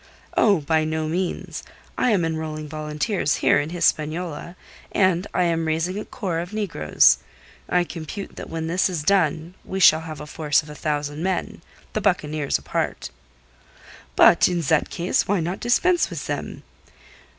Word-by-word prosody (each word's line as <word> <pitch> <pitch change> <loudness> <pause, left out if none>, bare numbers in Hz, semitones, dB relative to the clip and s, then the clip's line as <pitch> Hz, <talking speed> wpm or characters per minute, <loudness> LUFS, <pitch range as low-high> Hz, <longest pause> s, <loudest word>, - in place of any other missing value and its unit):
"Oh, 200 -7 +4
by 155 +2 +1
no 155 0 -2
means. 175 +3 -3 0.3
I - - +1
am 195 -7 +2
enrolling 155 -1 -4
volunteers 150 +2 -1
here - - +3
in 145 +2 -3
Hispaniola, 165 0 -1 0.4
and 185 -1 +2
I 180 - +1
am 165 -2 0
raising 165 +5 -1
a - - -6
corps 175 -5 -3
of 175 +4 -6
negroes. 195 - +3 0.5
I 180 0 +3
compute 175 +4 -7
that - - -8
when 165 -1 -4
this 180 +4 +1
is 170 -5 -3
done 165 -2 +1
we 190 - -4
shall 160 -3 +7
have 155 -2 -7
a 150 - -7
force 150 0 +1
of 150 - -11
a - - -7
thousand 150 0 -3
men, 185 -2 -2 0.3
the 215 - -1
buccaneers 155 -7 0
apart." - - -3 1.0
"But - - +6
in 175 -1 -1
that 155 0 +1
case 175 +2 0
why 200 -1 +2
not 175 +4 -3
dispense 345 +9 +2
with - - -6
them?" - - -5
165 Hz, 160 wpm, -23 LUFS, 155-185 Hz, 1.0 s, shall